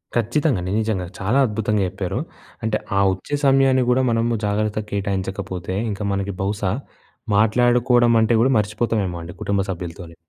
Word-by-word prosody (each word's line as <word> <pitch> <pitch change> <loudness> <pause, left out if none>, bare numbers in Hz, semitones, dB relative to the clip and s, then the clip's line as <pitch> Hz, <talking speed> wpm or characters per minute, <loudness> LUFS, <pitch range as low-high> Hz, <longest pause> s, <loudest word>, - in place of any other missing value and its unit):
ఖచ్చితంగండి. 120 - 0
నిజంగా. 100 -5 -2
చాలా 105 +8 +1
అద్భుతంగా 105 -1 0
చెప్పారు. 95 -1 -3 0.4
అంటే, 110 -1 +1 0.2
ఆ - - +4
ఒచ్చే 145 +10 -4
సమయాన్ని 135 -1 +4
గూడా 130 +1 +3
మనము 115 0 +1
జాగ్రత్తగా 105 +1 -1
కేటాయించకపోతే, 95 -2 -3 0.2
ఇంక 100 - -6
మనకి 100 0 -2
బహుశా 100 -1 -1 0.7
మాట్లాడుకోడమంటే 120 0 +4
గూడా 130 +3 +3
మర్చిపోతావేమో 105 -3 -1
అండి 85 - -8
కుటుంబ 100 -1 0
సభ్యులతోని. 85 -1 -7
105 Hz, 130 wpm, -21 LUFS, 95-120 Hz, 0.7 s, ఆ